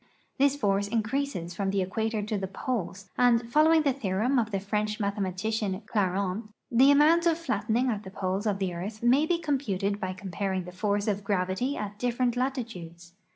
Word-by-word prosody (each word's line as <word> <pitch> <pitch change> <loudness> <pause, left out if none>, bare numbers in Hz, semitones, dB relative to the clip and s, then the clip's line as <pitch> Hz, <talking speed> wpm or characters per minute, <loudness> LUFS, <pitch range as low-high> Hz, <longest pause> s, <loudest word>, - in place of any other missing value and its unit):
This 280 0 +4
force 200 -6 +1
increases 220 -4 -2
from 195 +2 -1
the 195 -1 +1
equator 220 +3 -2
to 215 +1 -2
the 195 -1 -2
poles, 195 -2 -4
and, 240 -1 +4
following 315 +1 +5
the 280 -3 +2
theorem 245 +2 0
of 225 -2 0
the 200 -3 -1
French 210 +2 -2
mathema 200 -2 -1
tician, 205 +1 -2
Clairaut, 200 +1 -1 0.2
the 255 +3 +6
amount 315 +4 +5
of 330 -1 +3
flattening 230 -5 0
at 210 -2 -3
the 190 - -9
poles 190 +2 -2
of 205 -2 +1
the 190 -2 -2
earth 205 +6 -6
may 265 +6 +4
be 345 - +2
computed 205 - -1
by 185 -2 -3
comparing 190 0 -3
the 180 - -9
force 205 +3 -1
of 200 -1 -1
gravity 195 +7 -1
at 205 0 -5
different 245 0 0
latitudes. 220 - -4
210 Hz, 185 wpm, -28 LUFS, 190-245 Hz, 0.2 s, the